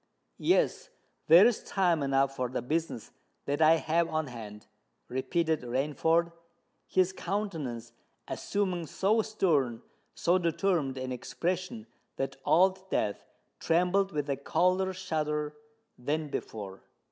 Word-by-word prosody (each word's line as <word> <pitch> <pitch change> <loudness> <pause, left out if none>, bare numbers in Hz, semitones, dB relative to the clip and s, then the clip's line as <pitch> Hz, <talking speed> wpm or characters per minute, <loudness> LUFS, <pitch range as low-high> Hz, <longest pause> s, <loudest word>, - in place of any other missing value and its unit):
"Yes—there 170 +6 +3
is 240 -2 +2
time 175 -5 +1
enough 135 0 +1
for 125 -2 -2
the 130 - -3
business 155 -3 -2 0.3
that 145 +2 -1
I 160 +1 +7
have 165 +1 +1
on 155 0 -1
hand!" 110 -5 -9 0.4
repeated 160 +5 0
Rainford, 150 +7 +1 0.6
his 185 0 +2
countenance 160 - -4 0.3
assuming 185 -5 -2
so 215 +7 +2
stern—so 170 - 0
determined 170 -5 0
an 130 0 -4
expression, 185 - -3 0.3
that 135 - -3
Old 190 +2 +3
Death 100 - -1 0.4
trembled 180 +4 +2
with 150 -2 -2
a 140 -1 -1
colder 185 +6 +1
shudder 150 -4 -2 0.5
than 150 +4 -2
before. 100 -7 -6
160 Hz, 110 wpm, -30 LUFS, 135-185 Hz, 0.6 s, I